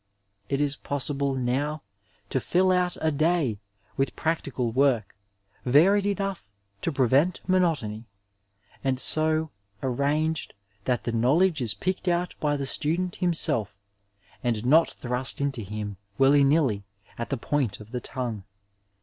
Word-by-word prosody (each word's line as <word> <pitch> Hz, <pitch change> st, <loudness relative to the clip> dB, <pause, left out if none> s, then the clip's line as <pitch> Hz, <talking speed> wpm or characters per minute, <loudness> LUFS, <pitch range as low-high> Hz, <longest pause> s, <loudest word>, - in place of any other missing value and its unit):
It 135 Hz, -, 0 dB
is 145 Hz, -1 st, 0 dB
possible 140 Hz, -1 st, -1 dB
now 135 Hz, +4 st, -1 dB, 0.5 s
to 130 Hz, -, +1 dB
fill 185 Hz, +8 st, +2 dB
out 180 Hz, -1 st, +1 dB
a 160 Hz, 0 st, +2 dB
day 155 Hz, -7 st, +1 dB, 0.4 s
with 135 Hz, -, 0 dB
pnM> 165 Hz, 0 st, 0 dB
tical 125 Hz, -4 st, -3 dB
work, 125 Hz, -7 st, +2 dB, 0.5 s
varied 190 Hz, +10 st, +4 dB
enough 195 Hz, -, -2 dB, 0.3 s
to 165 Hz, -, -1 dB
prevent 140 Hz, +6 st, +2 dB
monotony, 155 Hz, -, +1 dB, 0.8 s
and 130 Hz, -1 st, 0 dB
so 155 Hz, +2 st, +2 dB, 0.3 s
arranged 145 Hz, +5 st, 0 dB, 0.3 s
that 125 Hz, -2 st, 0 dB
the 120 Hz, -, -2 dB
knowledge 145 Hz, +8 st, +3 dB
is 115 Hz, -3 st, -1 dB
picked 185 Hz, +1 st, -3 dB
out 175 Hz, 0 st, +1 dB
by 145 Hz, -1 st, +1 dB
the 140 Hz, -, -3 dB
stodent 170 Hz, +6 st, -1 dB
himself, 115 Hz, -, 0 dB, 0.6 s
and 120 Hz, -2 st, -1 dB
not 160 Hz, +6 st, +5 dB
thrust 125 Hz, +1 st, -1 dB
into 140 Hz, -4 st, -1 dB
him, 105 Hz, 0 st, -5 dB, 0.2 s
wHly 140 Hz, +1 st, +6 dB
niUy, 135 Hz, -9 st, +2 dB, 0.4 s
at 115 Hz, -, -3 dB
the 140 Hz, -, -1 dB
point 130 Hz, -3 st, -1 dB
of 105 Hz, +1 st, -12 dB
the 125 Hz, -1 st, -3 dB
tongue. 120 Hz, -7 st, -4 dB
140 Hz, 140 wpm, -26 LUFS, 125-160 Hz, 0.8 s, wHly